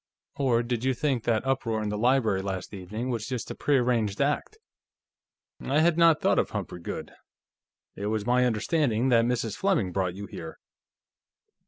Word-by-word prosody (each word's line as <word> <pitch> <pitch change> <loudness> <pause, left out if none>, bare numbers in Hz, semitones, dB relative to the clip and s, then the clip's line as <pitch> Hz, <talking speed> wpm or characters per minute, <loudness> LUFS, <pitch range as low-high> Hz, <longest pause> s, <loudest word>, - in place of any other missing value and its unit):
Or 125 -4 +2
did 120 -1 -2
you 130 0 +1
think 135 -4 -1
that 115 +1 +1
uproar 115 -5 0
in 105 - -2
the 105 - -2
library 115 -5 +2
last 95 0 -5
evening 105 +6 -4
was 115 -3 -3
just 125 -3 -4
a - - -5
prearranged 120 -7 +1
act?" 145 - 0 1.0
"I 145 +4 +1
had 170 0 +4
not 165 -2 +5
thought - - +3
of - - 0
Humphrey 90 - -5
Goode. 85 - -6 0.8
It 100 - -4
was 110 -1 -1
my 125 +1 +3
understanding 120 +1 +1
that 115 -2 +4
Mrs. 120 -3 -1
Fleming 180 - +1
brought 90 -1 -1
you 100 +1 -6
here." 80 -4 -8
120 Hz, 170 wpm, -27 LUFS, 105-135 Hz, 1.0 s, not